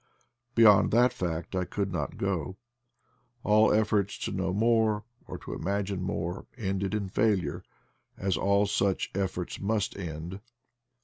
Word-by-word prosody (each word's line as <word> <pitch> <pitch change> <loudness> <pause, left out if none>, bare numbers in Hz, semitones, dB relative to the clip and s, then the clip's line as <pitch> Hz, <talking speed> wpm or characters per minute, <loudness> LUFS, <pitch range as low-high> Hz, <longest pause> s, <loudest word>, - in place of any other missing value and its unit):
Beyond 105 -3 +7
that 120 +2 +5
fact 85 0 -3
I 95 - +1
could 100 +1 -3
not 90 - -3
go: 95 -2 -2 0.9
all 110 +1 +5
efforts 105 -2 +1
to - - -3
know 95 -1 -1
more, 110 +1 +2 0.2
or - - -6
to - - -8
imagine 100 0 -2
more, 90 -1 -3
ended 100 -2 -2
in 100 -2 -2
failure, 100 -1 +1 0.6
as 95 -2 0
all 100 +5 +2
such 100 -1 0
efforts 95 -2 -3
must 105 0 -1
end. 85 0 -6
100 Hz, 135 wpm, -28 LUFS, 95-105 Hz, 0.9 s, Beyond